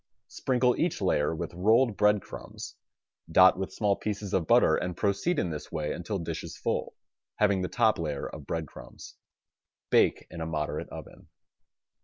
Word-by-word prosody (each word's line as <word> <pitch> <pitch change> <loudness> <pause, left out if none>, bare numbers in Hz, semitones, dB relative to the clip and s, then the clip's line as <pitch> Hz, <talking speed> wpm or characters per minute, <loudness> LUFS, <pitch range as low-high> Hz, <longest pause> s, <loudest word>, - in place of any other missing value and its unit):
Sprinkle 125 -1 +1
each 175 - 0
layer 80 -5 +1
with 80 - -5
rolled 110 +6 +3
bread 105 -1 +3
crumbs, - - -9 0.6
dot 95 +2 +6
with 95 -1 -3
small 100 0 +1
pieces 105 -2 -4
of 85 -4 +1
butter - - +5
and 90 -1 -3
proceed 100 - 0
in 90 -10 0
this 75 - -7
way 75 -1 -2
until 100 +4 -4
dish 85 - -4
is - - -8
full, - - -2 0.4
having 100 -3 +2
the 90 - -1
top 110 +1 +2
layer 75 -4 -3
of 75 -2 -10
bread 80 -1 -2
crumbs. - - -12 0.8
Bake - - +3
in 85 - -7
a 80 - -3
moderate 75 -2 -3
oven. - - -11
95 Hz, 170 wpm, -28 LUFS, 80-105 Hz, 0.8 s, dot